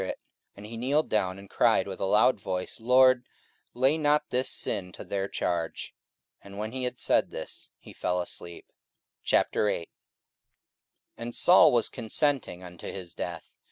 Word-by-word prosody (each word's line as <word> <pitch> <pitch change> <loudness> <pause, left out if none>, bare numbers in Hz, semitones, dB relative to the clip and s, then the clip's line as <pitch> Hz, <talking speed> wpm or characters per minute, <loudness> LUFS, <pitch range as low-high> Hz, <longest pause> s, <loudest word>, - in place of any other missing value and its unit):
44:007:060 95 - -3 0.5
And 100 - -11
he 115 +2 -8
kneeled 140 +6 +1
down, 95 -3 0
and 100 0 -12
cried - - +2
with - - -6
a - - -1
loud 105 +4 +4
voice, 90 +2 -4
Lord, 130 +1 +4 0.5
lay 135 +6 +2
not 150 0 +2
this 125 +1 0
sin 90 -2 0
to - - -9
their 100 -1 -2
charge. 85 -4 -3 0.5
And 100 0 -11
when 110 +1 -4
he 130 0 -3
had 125 0 -4
said - - +1
this, - - -8
he - - -14
fell 90 0 -1
asleep. 85 -1 -6 0.6
44:008:001 105 -5 +1 1.3
And 120 +1 -6
Saul 180 - +7
was 120 -3 +2
consenting 125 - -1
unto 90 -1 -10
his 90 -3 -8
death. - - -6
110 Hz, 160 wpm, -28 LUFS, 95-130 Hz, 1.3 s, Saul